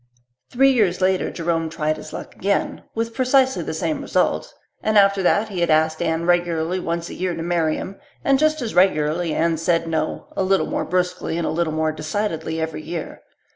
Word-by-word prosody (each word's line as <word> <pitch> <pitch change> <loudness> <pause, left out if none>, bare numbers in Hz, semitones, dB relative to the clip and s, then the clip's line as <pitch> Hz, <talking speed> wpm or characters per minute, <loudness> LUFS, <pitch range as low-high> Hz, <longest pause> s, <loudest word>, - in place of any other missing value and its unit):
Three 270 +2 +4
years 205 -8 +2
later 185 0 +1
Jerome 165 -1 -1
tried 155 -1 -1
his - - -9
luck - - -8
again, 200 +1 -1
with 230 0 -2
precisely 265 +1 +3
the - - -4
same - - -2
result, - - 0 0.3
and 215 0 +2
after 200 -1 +5
that 205 +4 +2
he 190 -3 -4
had 170 - +1
asked 160 +1 +2
Anne 165 0 0
regularly 175 0 +1
once 170 -1 -3
a - - -7
year 180 -1 -2
to 165 - -4
marry 165 -2 +1
him, 195 - -7 0.2
and 275 -1 +3
just 310 -2 +2
as 225 - -4
regularly 170 -2 +2
Anne 165 0 +1
said 165 +1 +1
no 160 -1 -2
a - - 0
little 190 0 +2
more - - -2
brusquely 180 -1 -1
and 170 - -1
a - - -1
little 165 0 0
more 155 0 +1
decidedly 160 0 -3
every 160 -1 -3
year. 165 +1 -6
175 Hz, 200 wpm, -22 LUFS, 160-195 Hz, 0.3 s, after